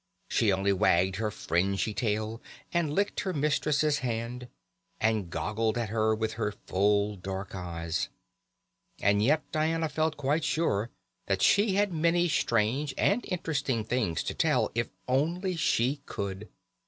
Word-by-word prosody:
She 110 -4 +3
only 95 +1 +2
wagged 95 -1 +3
her 110 0 -1
fringy 100 +2 0
tail, 110 0 -2 0.3
and 170 -4 +1
licked 200 +6 0
her 190 - -2
mistress's 150 0 +1
hand, 120 0 -3 0.5
and 110 -5 +1
goggled 105 +8 -1
at 115 -3 -1
her 110 0 +2
with 110 0 -2
her 105 -1 0
full 100 +2 +2
dark 95 +1 -5
eyes. 85 -3 -3 0.9
And 100 +1 +3
yet 150 +7 +3
Diana 160 +1 0
felt 155 +1 0
quite 145 +3 0
sure 115 -11 0 0.4
that 95 -1 +1
she 200 - +4
had 205 -2 +2
many 170 +2 +2
strange 130 -1 +1
and 220 +5 +2
interesting 145 - -1
things 110 -8 0
to - - -3
tell, - - +1
if - - 0
she - - -30 0.2
only 150 - +1
could. 100 +1 -5
115 Hz, 140 wpm, -29 LUFS, 100-155 Hz, 0.9 s, she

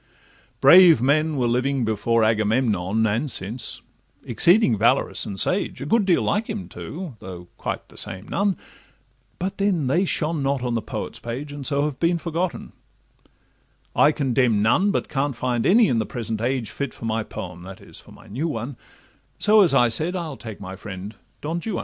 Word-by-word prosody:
Brave 170 0 +8
men 150 +4 +1
were 125 - +1
living 125 +2 0
before 110 +1 +1
Agamemnon 110 -2 +1
And 115 +7 0
since, 115 +2 -3 0.4
exceeding 175 - +4
valorous - - +1
and 95 -1 -5
sage, 190 - -1
A - - -5
good 225 -2 +2
deal 180 -3 +3
like 215 +2 0
him 210 -3 -4
too, 160 -7 -8
though 90 -2 -10
quite - - -5
the - - -16
same 95 -1 -6
none; 200 -1 0 0.8
But 190 +3 -4
then 195 -7 +1
they 170 +9 +2
shone 160 -3 -1
not 135 -1 -1
on 125 -1 -1
the 115 - 0
poet's 110 - -6
page, 125 +5 -6
And 145 -2 -5
so 140 -1 +1
have 145 -4 -4
been 170 +1 +2
forgotten:—I 170 -2 -4
condemn 125 -7 +1
none, 175 - +3
But 205 - -1
can't 140 -1 -1
find 120 -1 -1
any 220 +4 +5
in 115 - +1
the 110 - -2
present 115 -2 -4
age 120 -2 -1
Fit 140 -2 -4
for - - -8
my 110 0 0
poem 90 -4 -8
(that 95 +1 -10
is, - - -10
for - - -17
my - - -16
new 135 +10 -3
one); 120 -2 -5 0.6
So, 215 0 +5
as 170 -8 +4
I 120 -3 +5
said, 160 +10 0
I'll 165 -5 -4
take 110 -5 -9
my 95 -1 -7
friend 95 +1 -8 0.3
Don 165 +3 -3
Juan. 220 -4 -2
130 Hz, 185 wpm, -23 LUFS, 110-165 Hz, 0.8 s, Brave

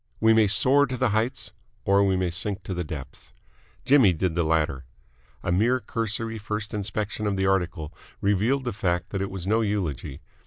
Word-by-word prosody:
We 110 0 +5
may 110 -1 +5
soar 135 +8 +4
to 125 -1 -4
the - - +2
heights 110 -1 -1 0.3
or 100 +1 +4
we 95 -1 +2
may 90 -2 0
sink 100 +2 -1
to 95 - -4
the 90 0 -2
depths. 75 -5 -9 0.5
Jimmy 130 -9 +6
did 85 +1 -1
the 85 - +1
latter. 75 -4 0 0.6
A - - -1
mere 115 +8 +3
cursory 115 -1 -2
first 105 +1 -4
inspection 105 +1 -2
of 100 -1 -1
the 95 - +1
article 90 -5 -1 0.3
revealed 105 +7 +1
the 120 -3 -3
fact 90 -3 -1
that 95 - -2
it 100 - -2
was 95 -2 -5
no 110 +3 +2
eulogy. 80 - -3
100 Hz, 190 wpm, -25 LUFS, 90-110 Hz, 0.6 s, Jimmy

